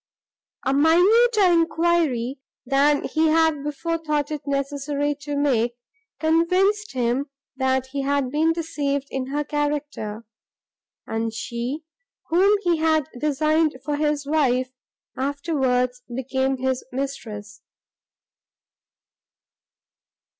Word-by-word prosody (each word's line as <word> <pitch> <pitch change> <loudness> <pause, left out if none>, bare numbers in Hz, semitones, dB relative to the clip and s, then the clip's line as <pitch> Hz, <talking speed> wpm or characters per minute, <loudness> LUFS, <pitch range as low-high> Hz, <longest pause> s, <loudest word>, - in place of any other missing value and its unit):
A 265 - +2
minuter 395 - +5
enquiry 330 -7 +2 0.3
than 280 +2 +3
he 320 0 +1
had 320 -2 +3
before 330 +3 -2
thought 300 -2 -1
it 300 -2 -3
necessary 285 +1 -1
to 285 +1 -3
make, 245 -5 +1 0.4
convinced 365 +6 +2
him, 255 +3 0 0.3
that 260 -1 +1
he 280 0 -2
had 275 -2 0
been 315 +3 +2
deceived 285 -4 -2
in 260 -1 -3
her 290 +2 -1
character, 290 -7 -3 0.8
and 225 0 -2
she, 240 +6 -4 0.5
whom 385 +5 +4
he 345 -2 +2
had 315 -1 +1
designed 305 +1 +1
for 295 0 -1
his 295 -1 0
wife, 260 -4 +1 0.4
afterwards 260 -3 0
became 265 +2 -1
his 260 0 -1
mistress. 225 -6 -5
285 Hz, 105 wpm, -23 LUFS, 260-315 Hz, 0.8 s, minuter